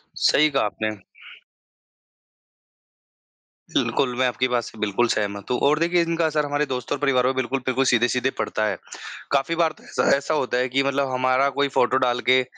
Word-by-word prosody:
सही 155 Hz, +1 st, +3 dB
कहा 140 Hz, -1 st, 0 dB
आपने। 110 Hz, +1 st, -3 dB, 2.8 s
बिल्कुल, 125 Hz, -3 st, 0 dB
मैं 130 Hz, -, +1 dB
आपकी 125 Hz, +1 st, 0 dB
बात 120 Hz, -1 st, 0 dB
से 110 Hz, -, -11 dB
बिल्कुल 105 Hz, +3 st, +1 dB
सहमत 100 Hz, 0 st, -2 dB
हूँ। 125 Hz, -, +1 dB
और 150 Hz, +1 st, +2 dB
देखिए 170 Hz, +1 st, +2 dB
इनका 170 Hz, 0 st, 0 dB
असर 150 Hz, -1 st, 0 dB
हमारे 145 Hz, +1 st, -1 dB
दोस्त 125 Hz, -3 st, -5 dB
और 145 Hz, -, +1 dB
परिवार 135 Hz, -3 st, +1 dB
पर 130 Hz, +1 st, +1 dB
बिल्कुल 130 Hz, +1 st, -1 dB
बिल्कुल 130 Hz, +1 st, +1 dB
सीधे-सीधे 125 Hz, +1 st, +2 dB
पड़ता 110 Hz, -, -1 dB
है। -, -, -2 dB, 0.5 s
काफ़ी 140 Hz, +4 st, +1 dB
बार 165 Hz, -2 st, +2 dB
तो -, -, -20 dB
ऐसा -, -, -1 dB
ऐसा 145 Hz, +3 st, -3 dB
होता 130 Hz, -4 st, -1 dB
है 125 Hz, +1 st, 0 dB
कि 135 Hz, +2 st, +1 dB
मतलब 140 Hz, -1 st, -1 dB
हमारा 130 Hz, +2 st, +2 dB
कोई 140 Hz, -, +3 dB
फ़ोटो 125 Hz, +1 st, +3 dB
डाल 125 Hz, -2 st, +1 dB
के 130 Hz, 0 st, +5 dB
130 Hz, 185 wpm, -23 LUFS, 125-145 Hz, 2.8 s, के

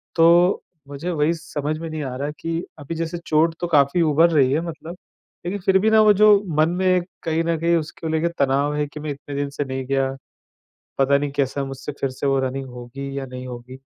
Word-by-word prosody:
तो 175 Hz, +3 st, +5 dB, 0.2 s
मुझे 145 Hz, +5 st, -5 dB
वही 155 Hz, 0 st, +1 dB
समझ 155 Hz, -2 st, -4 dB
में 165 Hz, 0 st, -5 dB
नहीं 155 Hz, -1 st, -4 dB
आ 130 Hz, -2 st, -4 dB
रहा 145 Hz, +2 st, -3 dB
कि 165 Hz, +1 st, -3 dB, 0.2 s
अभी, 145 Hz, +3 st, -6 dB
जैसे 165 Hz, +1 st, -3 dB
चोट 160 Hz, +2 st, +2 dB
तो 175 Hz, -, -2 dB
काफ़ी 150 Hz, +1 st, +3 dB
उभर 165 Hz, +1 st, +4 dB
रही 135 Hz, -5 st, +4 dB
है 150 Hz, +4 st, +1 dB
मतलब। 170 Hz, +1 st, -7 dB, 0.5 s
लेकिन 195 Hz, +3 st, -2 dB
फिर 190 Hz, +1 st, +4 dB
भी 220 Hz, +3 st, +3 dB
ना, 220 Hz, 0 st, +6 dB
वो 210 Hz, -1 st, +6 dB
जो 210 Hz, 0 st, +5 dB
मन 155 Hz, +1 st, +4 dB
में 180 Hz, +2 st, -1 dB
एक 180 Hz, -1 st, +2 dB, 0.2 s
कहीं 165 Hz, 0 st, 0 dB
न 165 Hz, 0 st, 0 dB
कहीं 170 Hz, +1 st, +2 dB
उसको 160 Hz, 0 st, -4 dB
लेके 160 Hz, +1 st, +1 dB
तनाव 140 Hz, +1 st, +2 dB
है 150 Hz, 0 st, 0 dB
कि 150 Hz, +1 st, -10 dB
मैं 150 Hz, -, -5 dB
इतने 140 Hz, 0 st, -8 dB
दिन 140 Hz, 0 st, -2 dB
से 145 Hz, +1 st, -4 dB
नहीं 130 Hz, -1 st, -4 dB
गया। 135 Hz, 0 st, 0 dB, 0.9 s
पता 135 Hz, +1 st, +4 dB
नहीं 145 Hz, 0 st, -2 dB
कैसा, 140 Hz, 0 st, -1 dB
मुझसे 135 Hz, +2 st, -6 dB
फिर 135 Hz, -, +1 dB
से 130 Hz, +2 st, -3 dB
वो 135 Hz, 0 st, +2 dB
रनिंग 135 Hz, +1 st, -3 dB
होगी 130 Hz, +3 st, -7 dB
या 135 Hz, -, -5 dB
नहीं 130 Hz, 0 st, -8 dB
होगी। 125 Hz, +1 st, -9 dB
150 Hz, 230 wpm, -22 LUFS, 135-170 Hz, 0.9 s, ना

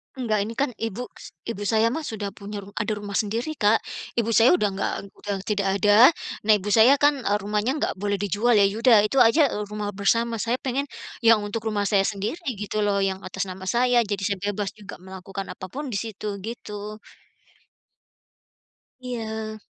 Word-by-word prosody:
Enggak 225 Hz, -5 st, 0 dB
ini 225 Hz, -, -6 dB
kan 275 Hz, +2 st, +1 dB
ibuks 225 Hz, +2 st, -6 dB
ibu 220 Hz, -3 st, -5 dB
saya 225 Hz, +1 st, +3 dB
mah 320 Hz, -, -2 dB
sudah 205 Hz, -2 st, -4 dB
punya 205 Hz, 0 st, -8 dB
ru 200 Hz, -, -13 dB
ada 210 Hz, +1 st, -1 dB
rumah 205 Hz, -1 st, -7 dB
sendiri 225 Hz, +8 st, -1 dB
Kak. 210 Hz, +1 st, +3 dB, 0.3 s
Ibu 230 Hz, 0 st, +1 dB
saya 225 Hz, -1 st, +6 dB
udah 210 Hz, +1 st, +1 dB
nggak 195 Hz, -, -2 dB, 0.2 s
udah 205 Hz, -1 st, -4 dB
tidak 200 Hz, -2 st, 0 dB
ada. 210 Hz, +5 st, +8 dB, 0.4 s
Nah 215 Hz, -, +7 dB
ibu 205 Hz, +1 st, -5 dB
saya 235 Hz, +6 st, +7 dB
kan, 290 Hz, +1 st, +4 dB
eee, 205 Hz, +1 st, +3 dB
rumahnya 210 Hz, +4 st, 0 dB
nggak -, -, -1 dB
boleh 205 Hz, 0 st, -1 dB
dijual 205 Hz, +4 st, +1 dB
ya 200 Hz, -, +6 dB
ya 200 Hz, +2 st, -1 dB
udah 235 Hz, -3 st, +7 dB
itu 270 Hz, +6 st, -2 dB
aja, 230 Hz, +8 st, +6 dB
eee, 210 Hz, -, -3 dB
rumah 210 Hz, 0 st, -4 dB
bersama. 230 Hz, +3 st, +1 dB
Saya 235 Hz, +2 st, 0 dB
pengen 275 Hz, +2 st, -1 dB, 0.3 s
yang 225 Hz, -2 st, +5 dB
untuk 220 Hz, +2 st, -4 dB
rumah 205 Hz, -2 st, 0 dB
saya 195 Hz, 0 st, +3 dB
sendiri, 215 Hz, -, -3 dB, 0.2 s
gitu 210 Hz, +1 st, -3 dB
loh, 200 Hz, -1 st, +1 dB
yang 190 Hz, -1 st, -1 dB
atas 190 Hz, +2 st, -4 dB
nama 190 Hz, +1 st, -8 dB
saya. 245 Hz, +1 st, +3 dB
Jadi 205 Hz, -3 st, -3 dB
saya 200 Hz, -1 st, 0 dB
bebas 205 Hz, -1 st, -2 dB
juga 205 Hz, -2 st, -10 dB
melakukan 190 Hz, +1 st, -8 dB
apapun 260 Hz, +9 st, -7 dB
di -, -, 0 dB
situ, 215 Hz, -2 st, -6 dB
gitu. 210 Hz, -1 st, -7 dB, 2.0 s
Iya. 220 Hz, -3 st, -5 dB
210 Hz, 185 wpm, -24 LUFS, 200-230 Hz, 2.0 s, ada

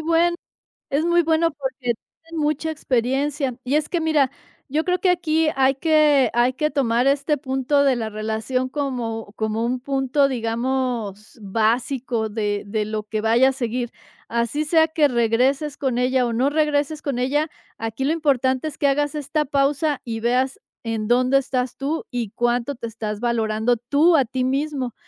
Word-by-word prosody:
buen 335 Hz, +2 st, +2 dB, 0.6 s
es 285 Hz, +3 st, +1 dB
muy 345 Hz, 0 st, +4 dB
bueno 325 Hz, +1 st, +2 dB
porque 265 Hz, -3 st, -3 dB, 0.3 s
tienen 330 Hz, -1 st, -5 dB
mucha 305 Hz, +2 st, 0 dB
experiencia. 270 Hz, 0 st, -1 dB
Y 265 Hz, +4 st, +1 dB
es 305 Hz, 0 st, +1 dB
que 345 Hz, -, 0 dB
mira, 310 Hz, -5 st, +2 dB, 0.4 s
yo 305 Hz, +4 st, 0 dB
creo 360 Hz, 0 st, +1 dB
que 370 Hz, -, +2 dB
aquí 325 Hz, -3 st, +2 dB
hay 270 Hz, 0 st, +3 dB
que 300 Hz, -2 st, +4 dB
hay 240 Hz, +2 st, +3 dB
que 300 Hz, +4 st, 0 dB
tomar 250 Hz, -3 st, +1 dB
este 280 Hz, +2 st, +2 dB
punto 265 Hz, +1 st, +1 dB
de 270 Hz, -2 st, +3 dB
la 220 Hz, -2 st, -3 dB
relación 220 Hz, +4 st, -2 dB
como 240 Hz, -7 st, -3 dB
como 220 Hz, +1 st, -1 dB
un 250 Hz, +2 st, -1 dB
punto, 270 Hz, +1 st, +1 dB
digamos 235 Hz, -3 st, -2 dB
básico 230 Hz, +3 st, 0 dB
de 205 Hz, -1 st, -2 dB
de 210 Hz, +1 st, -2 dB
lo 215 Hz, 0 st, -3 dB
que 215 Hz, 0 st, -3 dB
vaya 235 Hz, +4 st, +4 dB
a -, -, 0 dB
seguir, 245 Hz, -2 st, -3 dB, 0.4 s
así 235 Hz, +6 st, -1 dB
sea 320 Hz, +1 st, +4 dB
que 315 Hz, -2 st, +3 dB
regreses 255 Hz, +4 st, +1 dB
con 260 Hz, -4 st, -1 dB
ella 255 Hz, 0 st, +2 dB
o 235 Hz, -, -2 dB
no 260 Hz, +5 st, +2 dB
regreses 300 Hz, 0 st, 0 dB
con 275 Hz, -4 st, -2 dB
ella, 290 Hz, +5 st, +1 dB, 0.3 s
aquí 225 Hz, +3 st, -4 dB
lo 295 Hz, -, +2 dB
importante 270 Hz, -3 st, +1 dB
es 300 Hz, -, -7 dB
que 285 Hz, -, +2 dB
hagas 290 Hz, +2 st, +1 dB
esta 300 Hz, +1 st, -1 dB
pausa 285 Hz, +1 st, +1 dB
y 225 Hz, -2 st, -4 dB
veas 250 Hz, +3 st, 0 dB, 0.2 s
en 225 Hz, -2 st, -2 dB
dónde 255 Hz, +2 st, +4 dB
estás 255 Hz, -2 st, -1 dB
tú 290 Hz, +4 st, -3 dB
y 240 Hz, -4 st, -2 dB
cuánto 240 Hz, +5 st, -1 dB
te 235 Hz, -1 st, -6 dB
estás 215 Hz, -2 st, -5 dB
valorando 225 Hz, 0 st, +1 dB
tú 285 Hz, +9 st, +3 dB
a 275 Hz, -, +5 dB
ti 255 Hz, +1 st, -2 dB
mismo, 270 Hz, -2 st, -1 dB
260 Hz, 175 wpm, -22 LUFS, 235-295 Hz, 0.6 s, a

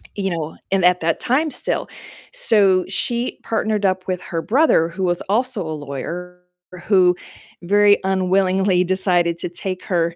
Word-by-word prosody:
you 195 Hz, -2 st, -2 dB
know, 160 Hz, -2 st, -4 dB
and 195 Hz, -2 st, +1 dB
at 180 Hz, 0 st, +3 dB
that 165 Hz, 0 st, 0 dB
time 295 Hz, +5 st, 0 dB
still. -, -, -2 dB, 0.5 s
So 200 Hz, -, +3 dB
she 235 Hz, +5 st, -1 dB
partnered 215 Hz, -2 st, -1 dB
up 185 Hz, 0 st, 0 dB
with 185 Hz, -1 st, -2 dB
her 165 Hz, -2 st, -4 dB
brother, 240 Hz, -, +3 dB
who 185 Hz, +3 st, -5 dB
was 175 Hz, -1 st, 0 dB
also 240 Hz, 0 st, 0 dB
a 160 Hz, -1 st, -5 dB
lawyer, 170 Hz, +6 st, -7 dB, 0.4 s
who 180 Hz, -3 st, +4 dB, 0.5 s
very 205 Hz, +2 st, +4 dB
unwillingly 190 Hz, 0 st, +2 dB
decided 180 Hz, -2 st, +1 dB
to -, -, -4 dB
take 185 Hz, +1 st, -5 dB
her 170 Hz, -2 st, -1 dB
185 Hz, 155 wpm, -20 LUFS, 175-205 Hz, 0.5 s, who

